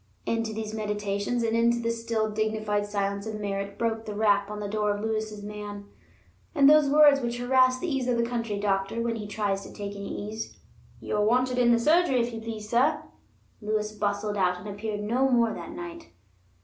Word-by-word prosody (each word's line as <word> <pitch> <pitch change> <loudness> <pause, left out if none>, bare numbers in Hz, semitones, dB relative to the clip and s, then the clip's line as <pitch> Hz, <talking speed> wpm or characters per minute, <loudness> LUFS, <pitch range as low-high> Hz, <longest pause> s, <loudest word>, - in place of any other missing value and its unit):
Into 225 -1 -1
these 215 0 -5
meditations, 210 +2 -2
and 225 0 +1
into 235 +1 +3
the 230 0 0
still 230 -2 -1
dignified 215 -1 -1
silence 200 0 -2
of 215 -1 -4
Merritt 200 -1 -3
broke 225 -1 -1
the 210 - -4
rap 205 -1 +2
on 210 0 -5
the 205 - -3
door 210 0 0
of 205 - -6
Lewis's 215 -1 -3
man, 205 -1 -7 0.7
and 280 -2 +6
those 300 -1 +6
words 290 -1 +6
which 240 0 -2
harass 255 +1 +3
the 360 - -3
ease 270 -5 -1
of 245 -1 +1
the 235 - +2
country 230 -3 -2
doctor 195 +2 0
when 230 0 -1
he 210 -2 -6
tries 205 -2 -1
to - - -10
take 200 -1 -6
any 200 0 -5
ease: 220 0 -6 0.4
"You're 210 - -1
wanted 250 +3 +2
in 240 -1 +5
the 235 - +5
surgery, 305 +1 +3
if 235 0 -1
you 225 - -5
please, 220 -2 -6
sir." 270 +7 +2 0.6
Lewis 210 0 -1
bustled 205 0 -2
out, 180 -2 +2
and 180 +3 -9
appeared 205 +1 -4
no 245 +6 +1
more 235 -3 +3
that 170 - -7
night. 175 -1 -8
215 Hz, 200 wpm, -27 LUFS, 205-235 Hz, 0.7 s, and